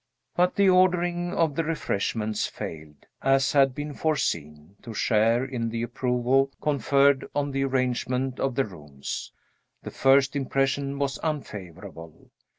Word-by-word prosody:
But 180 +1 +2
the 200 -1 +4
ordering 175 -1 +3
of 160 -3 +2
the 165 - -1
refreshments 110 -8 -1
failed, 75 -2 -9 0.2
as 135 -1 +3
had 135 -2 +4
been 145 +1 -5
foreseen, 80 - -2
to 115 -2 -9
share 115 +4 +2
in 120 -4 -3
the 115 +1 -3
approval 125 +2 +1
conferred 140 -1 +2
on 145 -1 0
the 135 0 0
arrangement 130 0 -1
of 135 -2 -1
the 135 0 +2
rooms. 75 -8 -7 0.5
The - - -7
first 135 +1 +3
impression 135 0 0
was 140 -1 -2
unfavorable. 95 - -7
135 Hz, 135 wpm, -26 LUFS, 110-140 Hz, 0.5 s, the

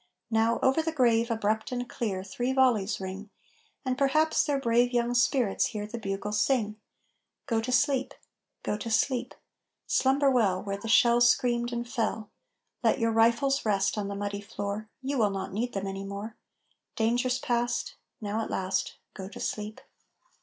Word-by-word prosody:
Now 225 +1 +3
over 265 +5 +4
the 325 0 -2
grave 235 -5 +3
abrupt 220 0 -1
and 245 0 -3
clear 195 -7 -3
Three 245 +7 -2
volleys 230 -7 +2
ring; 190 +2 -6 0.6
And 255 +1 -1
perhaps 310 +3 +3
their 290 -3 0
brave 240 -1 +2
young 240 0 +1
spirits 240 -3 +2
hear 210 -2 -4
The 230 +3 -6
bugle 195 0 -3
sing: 215 -1 +1 0.7
"Go 230 -5 0
to 250 +3 -3
sleep! 265 0 +1 0.5
Go 210 - -1
to 220 +2 -5
sleep! 245 +2 0 0.5
Slumber 275 +1 +3
well 205 -8 +2
where 200 0 -4
the 225 - -7
shell 235 +1 +5
screamed 240 0 +3
and 240 0 -3
fell 220 -2 -2 0.5
Let - - +3
your 230 -2 +1
rifles 235 +5 +3
rest 200 -3 +1
on 210 -2 -2
the 200 - -4
muddy 205 0 -3
floor, 205 +1 -5
You 275 0 -1
will 210 -2 +4
not 195 -1 -4
need 240 +4 -2
them 195 0 -3
any 195 0 -4
more. 200 +3 -6 0.6
Danger's 245 +3 +1
past; 240 -1 -1 0.3
Now 210 +1 -2
at - - -4
last, 190 0 -1 0.2
Go 190 - -7
to - - -10
sleep!" 210 0 -4
230 Hz, 165 wpm, -28 LUFS, 205-245 Hz, 0.7 s, shell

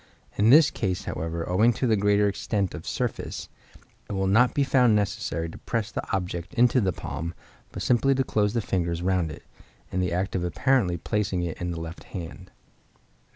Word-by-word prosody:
In 105 +2 +3
this 150 +4 +7
case, 95 -4 -2
however, 80 +1 -4
owing 110 +7 +3
to 130 - -2
the 115 -3 +3
greater 105 0 +3
extent 100 -1 -1
of - - -8
surface, - - -3 0.6
it - - -3
will 95 0 0
not 110 +6 +4
be 145 - +3
found 125 -5 +4
necessary 95 -4 -1
to 80 - -10
press 115 -2 -2
the - - -2
object 90 +3 -3
into 125 +1 +4
the 95 -3 +1
palm, 85 +1 -5 0.4
but 90 - -5
simply 125 +5 +3
to 135 - +2
close 105 -3 0
the 115 - +2
fingers 85 -4 -1
round 90 -3 +1
it, - - -10 0.5
in 95 - -1
the 90 -1 0
act 95 +3 -1
of 90 - 0
apparently 90 0 +1
placing 95 -1 -1
it 85 -1 -5
in 90 - -2
the 85 -1 -4
left 80 +1 -8
hand. 90 +1 -8
95 Hz, 195 wpm, -26 LUFS, 90-115 Hz, 0.6 s, this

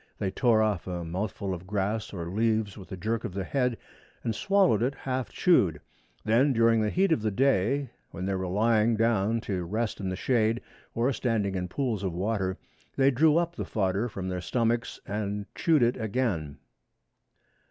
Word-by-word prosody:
They 95 - -2
tore 115 -2 +3
off 105 -5 -1
a 90 -2 -4
mouthful 95 +2 -3
of 90 0 -8
grass 105 +2 -2
or 85 -4 -5
leaves 110 -1 0
with 95 - -12
a 95 - -5
jerk 110 +5 -2
of 90 - -5
the 100 - -2
head 125 +2 0 0.5
and 115 - -1
swallowed 190 - +3
it 130 +3 0
half 130 -1 -3
chewed. 95 - +3 0.5
Then, 125 +6 +4
during 115 -1 +4
the 105 - +1
heat 190 - +2
of 140 - +2
the 110 - 0
day, 130 +3 +1 0.2
when 90 +2 -6
they 100 - -1
were 95 -1 -2
lying 110 +4 +3
down 115 0 +1
to 95 -5 -3
rest 110 +6 -2
in 95 -2 -3
the 95 - -2
shade, 115 +2 +1 0.4
or 120 +4 +1
standing 110 -6 0
in 90 -1 -2
pools 115 0 -2
of 95 -3 -2
water, 95 0 -1 0.4
they 135 0 +4
drew 155 +4 +4
up 170 0 0
the - - -3
fodder 100 +3 -1
from 95 -3 -5
their 90 -1 -3
stomachs 115 +3 -1
and 105 0 -3
chewed 155 -6 +3
it 120 +1 +2
again. 105 - -2
110 Hz, 185 wpm, -28 LUFS, 95-120 Hz, 0.5 s, Then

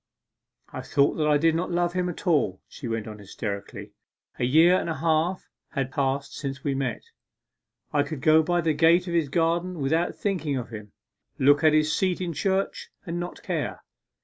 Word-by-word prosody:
'I - - -4
thought 140 0 +2
that 155 -1 +1
I 150 -1 +4
did 165 +2 +3
not 165 +2 -1
love 175 0 0
him 180 -1 0
at 175 - -8
all,' 140 - +2
she 130 - -8
went 115 -2 -3
on 105 -1 -8
hysterically. 100 0 -6 0.5
'A - - +1
year 160 +8 +5
and 170 - -1
a 160 - -2
half 165 +3 0 0.3
had 135 -3 -2
passed 140 -1 -1
since 135 -1 -5
we 140 - 0
met. 135 -3 -3 0.9
I 145 - +3
could 145 -1 -4
go 155 0 +5
by 175 +2 +1
the 160 -1 +1
gate 170 +4 +4
of 170 - -3
his 165 -4 +1
garden 170 +3 0
without 160 +4 0
thinking 160 -9 -1
of 125 - -5
him 105 -2 -9 0.5
look 145 +2 +4
at 155 -1 +5
his 155 0 +3
seat 185 -2 0
in 175 -2 -3
church 190 +6 -1 0.2
and 170 -1 -3
not 175 0 -6
care. - - -3
155 Hz, 195 wpm, -26 LUFS, 135-175 Hz, 0.9 s, year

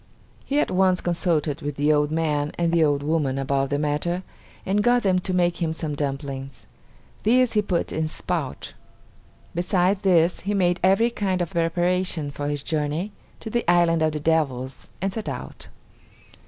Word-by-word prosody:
He 280 - -1
at - - +1
once 185 0 +3
consulted 165 -3 0
with 145 -1 -4
the 145 +2 +3
old 150 0 +2
man 150 -2 0
and 170 -1 +1
the 170 -1 +4
old 145 -2 +1
woman 145 -3 0
about 135 0 0
the 145 - 0
matter, 150 +5 -1 0.4
and 200 +2 +1
got 245 +2 +3
them 185 -2 +3
to 185 - -3
make 175 -1 +1
him 160 -1 0
some 160 -2 -4
dumplings. 135 -2 -4 0.6
These 250 +3 +3
he 210 - +3
put 185 -4 -1
in 160 - -2
his 155 0 -3
pouch. 165 -7 -3 0.8
Besides 180 +2 +1
this 175 -2 +3
he 205 +2 -2
made 180 -2 +2
every 195 +6 +4
kind 195 -5 -1
of 175 -2 -2
preparation 175 -2 0
for 145 0 -4
his 145 -1 -2
journey 155 +5 -2 0.3
to 220 - -6
the 240 +1 0
island 170 -2 +4
of 155 -1 +2
the 150 - -2
devils 140 -5 -1 0.2
and 195 0 0
set 220 0 -4
out. - - -7
165 Hz, 180 wpm, -24 LUFS, 145-185 Hz, 0.8 s, the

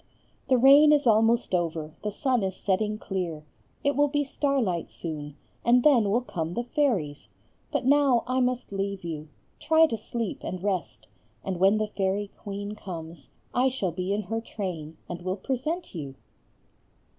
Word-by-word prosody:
"The 260 - +5
rain 280 +4 +8
is 290 -2 +4
almost 225 0 +3
over, 160 -3 -1
the 210 - -1
sun 255 +2 +1
is 190 -1 -2
setting 210 +3 0
clear. 175 -8 -4 0.4
It 285 0 +2
will 290 +1 +4
be 290 0 0
starlight 265 - -1
soon, 150 -3 -6 0.3
and 245 +1 +4
then 240 -9 +5
will 230 +5 +2
come 170 -8 -4
the 240 - -1
fairies. 220 - -1 0.4
But - - -1
now 275 -3 +4
I 255 +1 0
must 250 -2 0
leave 195 -1 -3
you; 160 -2 -5 0.3
try 320 0 +5
to 230 -8 -2
sleep 225 -1 -4
and 185 0 -5
rest, 190 -6 -2 0.4
and 190 -2 -3
when 195 +3 +5
the 215 - +1
fairy 200 0 -2
queen 200 +1 -6
comes, 165 -7 -8 0.2
I 255 +2 +3
shall 205 -9 -2
be 180 +3 -3
in 210 +1 0
her 225 +4 -3
train, 170 -8 -6
and 175 0 -6
will 185 +2 -2
present 305 - -3
you." 140 -6 -6
205 Hz, 170 wpm, -27 LUFS, 180-250 Hz, 0.4 s, rain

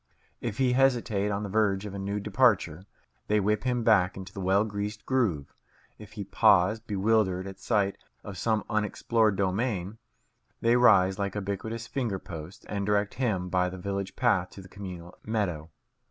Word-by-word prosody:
If 110 -3 -4
he 130 -2 +2
hesitate 120 -6 +2
on 100 0 -2
the 100 - -4
verge 100 -1 +1
of 100 - -6
a 100 - -5
new 100 +1 -2
departure, 100 -5 +1 0.4
they 105 0 +3
whip 105 +4 0
him 125 -2 0
back 100 -5 +3
into 95 -1 -9
the 100 - -6
well 95 +2 +3
greased 105 0 -5
groove; 100 - 0 0.5
if - - -12
he - - -5
pause, 95 +5 +4
bewildered, 100 -3 +1
at 95 -1 -9
sight 100 -4 0 0.2
of 100 - -7
some 110 +4 0
unexplored 110 0 +1
domain, 100 +1 -1 0.6
they 115 +1 +3
rise 100 -6 +5
like 100 -1 -2
ubiquitous 105 +3 -4
finger 120 -7 -2
posts 85 0 -9
and 100 -1 -3
direct 105 0 +1
him 105 -8 -1
by 90 0 +1
the 95 - -8
village 100 +1 -4
path 95 -8 +2
to 100 - -11
the - - -13
communal 90 -3 -9
meadow. 90 -8 -2
100 Hz, 170 wpm, -28 LUFS, 95-110 Hz, 0.6 s, rise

